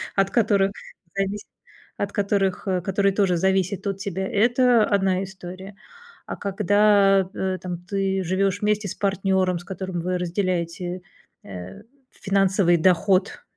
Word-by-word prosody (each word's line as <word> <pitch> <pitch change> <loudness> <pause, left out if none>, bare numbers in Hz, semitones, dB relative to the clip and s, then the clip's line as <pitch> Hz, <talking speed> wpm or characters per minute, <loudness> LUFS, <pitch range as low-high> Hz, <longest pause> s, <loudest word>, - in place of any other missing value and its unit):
от 195 -1 +2
которых 200 -4 +2 0.4
зависит 195 +1 -2 0.5
от 200 0 -2
которых 200 -2 -1
э, 185 -2 0
которые 195 +2 +1
тоже 190 -3 +2
зависят 190 +1 0
от 195 -1 -2
тебя, 190 -1 -4
это 240 +2 +3
одна 195 -2 +1
история. 190 +1 -9 0.5
А - - -5
когда, 200 -1 +3
э, 190 -1 -2
там 180 -1 -4
ты 195 0 -1
живешь 190 +2 0
вместе 210 0 0
с - - -5
партнером, 190 -2 0
с - - -12
которым 185 -1 -5
вы 180 +1 -1
разделяете, 180 0 -2 0.4
э, 90 -1 -9 0.3
финансовый 195 -3 +2
доход 185 - +2
195 Hz, 135 wpm, -23 LUFS, 185-200 Hz, 0.5 s, это